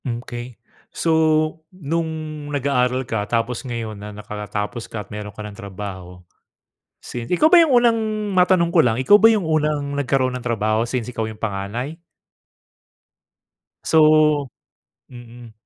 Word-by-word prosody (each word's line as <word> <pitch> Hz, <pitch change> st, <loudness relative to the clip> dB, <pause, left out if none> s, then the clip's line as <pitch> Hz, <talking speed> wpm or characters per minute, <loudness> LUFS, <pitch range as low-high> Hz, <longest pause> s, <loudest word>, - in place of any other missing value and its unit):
Mm, 120 Hz, -1 st, -4 dB
okey. 120 Hz, -1 st, -8 dB, 0.3 s
So, 165 Hz, -, -2 dB, 0.6 s
nung 165 Hz, -2 st, -2 dB, 0.4 s
nag-aaral 130 Hz, -2 st, 0 dB
ka 110 Hz, -3 st, -1 dB
tapos 115 Hz, +2 st, -1 dB
ngayon 115 Hz, -4 st, -5 dB
na 105 Hz, +1 st, -9 dB
nakatapos 105 Hz, +2 st, -5 dB
ka 105 Hz, -3 st, -5 dB
at -, -, -30 dB
meron 105 Hz, 0 st, -6 dB
ka 105 Hz, -, -10 dB
ng 105 Hz, -1 st, -9 dB
trabaho 95 Hz, -3 st, -8 dB, 0.8 s
since 120 Hz, -1 st, -6 dB
ikaw 180 Hz, -, +2 dB
ba 350 Hz, -, +8 dB
yung 320 Hz, -4 st, +3 dB
unang 235 Hz, -1 st, +3 dB, 0.3 s
matanong 180 Hz, -2 st, +3 dB
ko 175 Hz, -, +4 dB
lang, 115 Hz, -5 st, +1 dB
ikaw 170 Hz, +11 st, +5 dB
ba 225 Hz, -, +8 dB
yung 215 Hz, -4 st, +2 dB
unang 150 Hz, -2 st, 0 dB
nagkaroon 135 Hz, -2 st, 0 dB
ng 125 Hz, -, -5 dB
trabaho, 110 Hz, -2 st, 0 dB
since 120 Hz, 0 st, -3 dB
ikaw 120 Hz, -2 st, -3 dB
yung 110 Hz, -, -10 dB
panganay? 110 Hz, -, -4 dB, 1.8 s
So 155 Hz, -3 st, +4 dB, 0.6 s
mhm. 120 Hz, -1 st, -12 dB
125 Hz, 140 wpm, -21 LUFS, 110-155 Hz, 1.8 s, ba